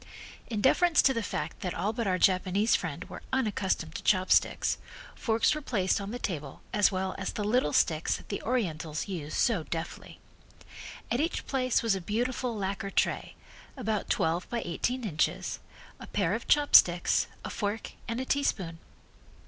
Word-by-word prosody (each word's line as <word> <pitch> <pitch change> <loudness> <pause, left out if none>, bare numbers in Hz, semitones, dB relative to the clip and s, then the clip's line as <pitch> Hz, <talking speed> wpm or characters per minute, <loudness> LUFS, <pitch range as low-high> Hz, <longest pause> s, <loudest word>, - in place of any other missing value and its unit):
In 215 -3 -2
deference 335 - +4
to 270 - +5
the 230 - -1
fact - - -4
that 180 - -3
all 200 +6 -1
but 230 -2 -2
our 185 -1 +2
Japanese 190 +4 +3
friend - - -3
were - - -9
unaccustomed 205 -10 0
to - - -5
chopsticks, 185 -2 +2 0.3
forks 225 -2 +2
were 305 - -4
placed 200 -8 0
on 200 - -5
the 240 - -4
table 150 - -5
as 210 0 +4
well 190 0 -2
as 195 - -2
the 210 - -3
little 210 -7 +2
sticks 160 +1 +2
that - - -15
the 200 - -3
Orientals 165 -11 -2
use 165 -6 -5
so 225 -8 +2
deftly. 165 +1 -6 0.9
At 240 - +1
each 325 +4 -1
place 255 -3 +1
was 225 -3 +3
a 190 - -2
beautiful 240 +4 -1
lacquer 195 0 -3
tray, - - 0 0.4
about 215 -5 -2
twelve 165 +2 0
by 235 -1 -2
eighteen 250 +9 -1
inches, 180 -1 -1 0.4
a - - -9
pair 195 -3 0
of 225 - -4
chopsticks, 185 -12 +5 0.2
a - - -4
fork 205 +1 -3 0.2
and 230 +1 -2
a 260 - -2
teaspoon. 195 -13 -1
205 Hz, 170 wpm, -29 LUFS, 180-240 Hz, 0.9 s, to